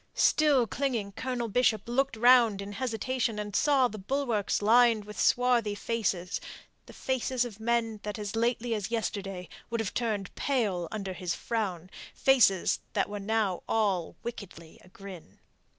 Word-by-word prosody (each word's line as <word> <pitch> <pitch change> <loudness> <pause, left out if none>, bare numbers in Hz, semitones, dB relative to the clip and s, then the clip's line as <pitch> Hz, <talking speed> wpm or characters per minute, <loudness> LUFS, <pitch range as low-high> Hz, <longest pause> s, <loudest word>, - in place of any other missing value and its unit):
Still 290 -5 +4
clinging, 230 -5 -2
Colonel 245 +2 -3
Bishop 225 0 +2
looked 245 0 0
round 240 -3 +5
in 200 0 -6
hesitation, 235 0 -2
and 210 -1 -5
saw 280 -4 +4
the 215 -3 -8
bulwarks 225 -3 -1
lined 230 -1 +4
with 210 -3 -9
swarthy 240 -4 +2
faces 205 -5 -2 0.5
the - - -11
faces 255 -1 -1
of 220 -3 -9
men 225 -1 0
that 210 0 -5
as 205 0 -5
lately 235 +1 0
as 210 -3 -3
yesterday 195 -5 -3 0.2
would 230 0 -2
have 205 -5 -3
turned 215 -5 -2
pale 205 -11 -1
under 195 -3 -4
his 180 -1 -3
frown, 190 -7 -3 0.3
faces 235 -9 +3
that - - 0
were 205 0 -5
now 205 -2 0
all 195 -6 0
wickedly 195 -8 -9
agrin. 185 - -12
220 Hz, 150 wpm, -29 LUFS, 200-240 Hz, 0.5 s, round